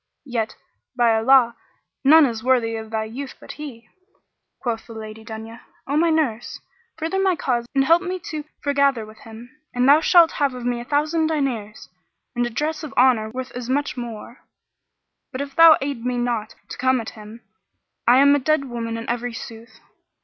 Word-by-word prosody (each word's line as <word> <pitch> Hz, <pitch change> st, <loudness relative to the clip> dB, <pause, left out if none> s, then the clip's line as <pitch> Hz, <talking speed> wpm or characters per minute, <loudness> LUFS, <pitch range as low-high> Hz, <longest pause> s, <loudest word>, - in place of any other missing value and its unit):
Yet, 235 Hz, -4 st, -3 dB, 0.4 s
by 235 Hz, -2 st, +4 dB
Allah, 235 Hz, +1 st, +4 dB, 0.5 s
none 310 Hz, +3 st, +7 dB
is 225 Hz, -4 st, -3 dB
worthy 245 Hz, -3 st, +2 dB
of 220 Hz, -1 st, -7 dB
thy 220 Hz, 0 st, -2 dB
youth 255 Hz, +5 st, -7 dB
but -, -, -10 dB
he." 250 Hz, -7 st, -9 dB, 0.7 s
Quoth 230 Hz, -3 st, -4 dB
the 230 Hz, -, -10 dB
Lady 220 Hz, 0 st, -9 dB
Dunya, 225 Hz, +1 st, -9 dB, 0.2 s
"O 280 Hz, -, -2 dB
my 335 Hz, +2 st, +3 dB
nurse, 280 Hz, -8 st, -1 dB, 0.4 s
further 325 Hz, +4 st, -2 dB
my 380 Hz, -2 st, +2 dB
cause 240 Hz, -6 st, -1 dB
and 270 Hz, 0 st, +3 dB
help 335 Hz, +4 st, +5 dB
me 370 Hz, 0 st, -3 dB
to 305 Hz, -1 st, -4 dB, 0.2 s
foregather 280 Hz, -5 st, +1 dB
with 215 Hz, 0 st, -15 dB
him, 230 Hz, +4 st, -13 dB, 0.2 s
and 250 Hz, +1 st, +2 dB
thou 295 Hz, +3 st, +7 dB
shalt 340 Hz, 0 st, +5 dB
have 280 Hz, -3 st, -1 dB
of 245 Hz, -1 st, -7 dB
me 245 Hz, -1 st, -1 dB
a -, -, -9 dB
thousand 310 Hz, +4 st, +1 dB
diners 250 Hz, -9 st, -3 dB, 0.5 s
and 240 Hz, 0 st, 0 dB
a -, -, -5 dB
dress 305 Hz, +7 st, -2 dB
of 305 Hz, -, -8 dB
honour 245 Hz, -4 st, +4 dB
worth 255 Hz, +3 st, -6 dB
as 245 Hz, 0 st, -7 dB
much 280 Hz, +2 st, -1 dB
more: 235 Hz, -1 st, -8 dB, 0.9 s
but 260 Hz, -, -6 dB
if 280 Hz, -1 st, -5 dB
thou 330 Hz, -1 st, +8 dB
aid 275 Hz, -4 st, -4 dB
me 250 Hz, 0 st, -1 dB
not 240 Hz, -3 st, -2 dB
to -, -, -8 dB
come 260 Hz, 0 st, +2 dB
at 225 Hz, -, -6 dB
him, 215 Hz, +2 st, -12 dB, 0.7 s
I 245 Hz, +2 st, +7 dB
am 280 Hz, +1 st, +6 dB
a -, -, +1 dB
dead 310 Hz, +1 st, +1 dB
woman 230 Hz, -2 st, -4 dB
in 230 Hz, -, -6 dB
very 240 Hz, 0 st, -3 dB
sooth." 225 Hz, +1 st, -10 dB
250 Hz, 190 wpm, -22 LUFS, 230-285 Hz, 0.9 s, thou